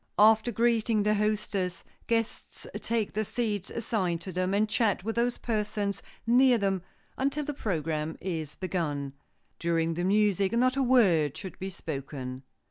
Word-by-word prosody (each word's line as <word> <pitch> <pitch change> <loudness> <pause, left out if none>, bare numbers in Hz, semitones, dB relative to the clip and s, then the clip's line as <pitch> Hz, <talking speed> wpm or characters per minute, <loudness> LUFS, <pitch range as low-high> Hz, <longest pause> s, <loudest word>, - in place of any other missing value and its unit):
After 220 +2 +5
greeting 230 -1 +2
the 210 +1 +3
hostess, 205 -4 -1 0.2
guests 230 -1 -2
take 225 -2 -1
the 215 - 0
seats 215 -3 -2
assigned 190 -7 -1
to 190 - -6
them, 185 +1 0
and 205 +2 +2
chat 215 -4 +1
with 225 +2 -2
those 240 +1 +1
persons 210 -3 -2 0.2
near 250 +1 +5
them 195 -3 0 0.4
until 280 +2 0
the 295 - -3
program 160 - -2
is 160 -5 -4
begun. 150 -7 -2 0.5
During 165 -1 +1
the 175 +2 -2
music 200 0 +2
not 255 +2 +3
a 275 - +1
word 195 - +4
should 190 - -8
be 190 - -3
spoken. 135 -6 -6
205 Hz, 150 wpm, -29 LUFS, 170-230 Hz, 0.5 s, After